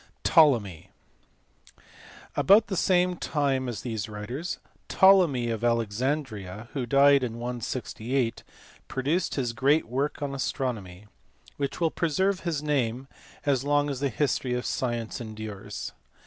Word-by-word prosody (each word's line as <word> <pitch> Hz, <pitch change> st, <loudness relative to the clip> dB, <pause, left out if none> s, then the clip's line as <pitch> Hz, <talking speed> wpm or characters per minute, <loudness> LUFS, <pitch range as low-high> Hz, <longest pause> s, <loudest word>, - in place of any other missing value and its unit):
Ptolemy*. 115 Hz, -, +3 dB, 1.5 s
About 210 Hz, +3 st, +5 dB
the 190 Hz, -, -1 dB
same 180 Hz, 0 st, +2 dB
time 135 Hz, -5 st, 0 dB
as 110 Hz, -6 st, -5 dB
these 110 Hz, -3 st, -3 dB
writers 120 Hz, +11 st, -5 dB, 0.3 s
Ptolemy 170 Hz, -12 st, +5 dB
of 115 Hz, 0 st, -4 dB
Alexandria, 115 Hz, -2 st, -1 dB
who 130 Hz, -4 st, -2 dB
died 140 Hz, +2 st, +5 dB
in 115 Hz, -2 st, -3 dB
168, 120 Hz, 0 st, -3 dB, 0.5 s
produced 145 Hz, +7 st, -1 dB
his 125 Hz, -4 st, -1 dB
great 140 Hz, +6 st, +3 dB
work 135 Hz, +5 st, -2 dB
on 140 Hz, -1 st, -3 dB
astronomy, 110 Hz, -9 st, -3 dB, 0.5 s
which 140 Hz, -1 st, -3 dB
will 165 Hz, -2 st, +2 dB
preserve 185 Hz, +4 st, +1 dB
his 160 Hz, -5 st, -3 dB
name 130 Hz, -3 st, -1 dB, 0.4 s
as 135 Hz, -3 st, +2 dB
long 145 Hz, 0 st, +2 dB
as 135 Hz, -, -4 dB
the 140 Hz, 0 st, 0 dB
history 125 Hz, 0 st, 0 dB
of 125 Hz, -, -3 dB
science 120 Hz, -2 st, -2 dB
endures. 110 Hz, -3 st, -6 dB
130 Hz, 125 wpm, -27 LUFS, 115-145 Hz, 1.5 s, About